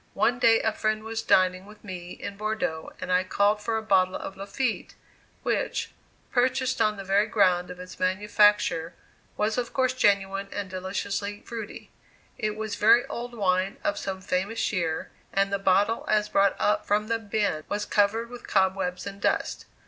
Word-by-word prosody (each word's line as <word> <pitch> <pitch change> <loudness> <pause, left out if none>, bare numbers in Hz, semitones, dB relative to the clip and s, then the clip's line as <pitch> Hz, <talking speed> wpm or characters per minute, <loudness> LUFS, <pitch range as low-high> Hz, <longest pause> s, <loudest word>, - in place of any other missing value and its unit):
One 235 +4 +2
day 225 -2 +5
a 220 - +1
friend 215 0 -1
was 225 0 -3
dining 185 +1 +2
with 210 0 -15
me 180 -3 -7
in 200 - -7
Bordeaux 215 -6 -3
and 185 0 -4
I 180 0 +3
called 205 +3 +2
for 225 +1 -1
a 220 - -3
bottle 190 -3 +3
of 195 - -6
"Lafitte," 215 +5 -3 0.5
which, - - -1 0.4
purchased 255 0 +1
on 215 -1 +2
the 195 - -6
very 200 +3 +2
ground 185 -5 +2
of 180 0 -8
its 185 0 -10
manufacture, 190 -3 +2 0.4
was 215 +3 +1
of 240 - -4
course 255 -1 +2
genuine 200 -4 +1
and 200 -2 -5
deliciously 200 +2 -3
"fruity." 225 -3 -8 0.5
It 215 0 -1
was 215 -1 -4
very 225 +4 +5
old 240 0 -6
wine 190 -1 +1
of 310 0 0
some 190 -1 -4
famous 190 +5 -1
year, 165 -4 -2 0.2
and 195 0 +1
the 200 - +1
bottle 200 +4 +2
as 210 -1 +2
brought 195 -1 +3
up 210 - +2
from 210 +1 +1
the 230 0 0
bin 205 -7 -1
was 205 0 -1
covered 220 +3 +1
with 245 - -9
cobwebs 190 -1 +1
and 200 0 -7
dust. - - 0
205 Hz, 175 wpm, -26 LUFS, 190-220 Hz, 0.5 s, day